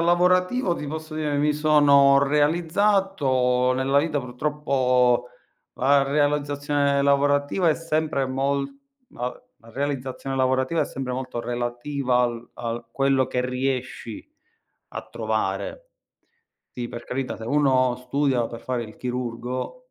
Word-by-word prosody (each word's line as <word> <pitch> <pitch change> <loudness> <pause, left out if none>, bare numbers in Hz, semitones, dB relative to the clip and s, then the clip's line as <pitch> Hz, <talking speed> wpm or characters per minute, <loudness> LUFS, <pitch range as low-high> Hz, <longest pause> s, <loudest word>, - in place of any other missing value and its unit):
lavorativo 180 +4 +2
ti 150 - -6
posso 155 0 -6
dire 150 -2 -1
mi 150 +1 +2
sono 145 -2 +5
realizzato 150 -5 +2
nella 130 +2 +2
vita. 150 -1 0
Purtroppo 125 -2 +1 0.5
la 140 +2 +3
realizzazione 145 0 +1
lavorativa 145 +4 +2
è 155 - +4
sempre 155 -4 -1
mol 140 +1 -1 0.4
ma 125 +1 -4
v - - -15 0.2
la 115 - -15
realizzazione 135 0 -3
lavorativa 130 +4 +1
è - - +2
sempre 130 -1 -5
molto 130 -1 -4
relativa 125 +2 -1
al 120 -1 -3
al 120 0 -5
quello 135 -1 +2
che 125 -1 -1
riesci 130 - -4 0.6
a - - -6
trovare. - - -3 0.8
Sì, 120 -1 -5
per 120 0 -7
carità, 130 0 -3
se - - -11
uno 130 -1 +2
studia 130 -1 0
per 115 - -9
fare 125 -2 -3
il 110 - -12
chirurgo 125 - -4
135 Hz, 125 wpm, -24 LUFS, 125-150 Hz, 0.8 s, sono